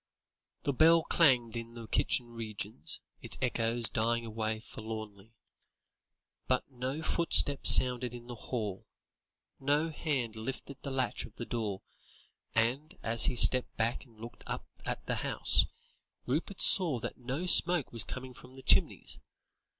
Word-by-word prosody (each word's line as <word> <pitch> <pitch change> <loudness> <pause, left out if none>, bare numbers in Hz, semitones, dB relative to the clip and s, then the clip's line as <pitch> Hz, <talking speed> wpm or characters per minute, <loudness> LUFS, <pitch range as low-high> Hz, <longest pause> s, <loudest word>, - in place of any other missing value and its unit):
The 140 - -1
bell 165 +4 +5
clanged 125 -10 +3
in 115 0 -7
the 115 -1 -8
kitchen 120 +2 0
regions, 105 -7 -3 0.2
its - - -2
echoes 115 -2 -1
dying 115 +1 -1
away 110 0 -3
forlornly, 110 -1 -9 1.1
but 130 0 0
no 130 +5 -5
footstep 155 -4 +3
sounded 125 -1 +6
in 120 0 -11
the 120 - -8
hall, 110 -4 -5 0.7
no 145 +4 0
hand 135 -8 -3
lifted 130 +4 -7
the 140 - -6
latch 130 -2 -2
of 110 - -17
the 120 - -6
door, 105 -5 -4 0.7
and 125 +7 -1
as 115 0 +6
he 130 - 0
stepped 125 +1 +4
back 115 +1 -1
and 115 -4 -23
looked 120 +1 -11
up - - -5 0.2
at - - -4
the - - -2
house, - - +2 0.6
Rupert 160 +9 -3
saw 170 -9 +4
that 115 - -7
no 130 +8 -4
smoke 175 -4 +4
was 115 - +2
coming 130 0 -8
from 125 +1 -15
the 135 - -12
chimneys. - - +3
120 Hz, 145 wpm, -31 LUFS, 115-135 Hz, 1.1 s, sounded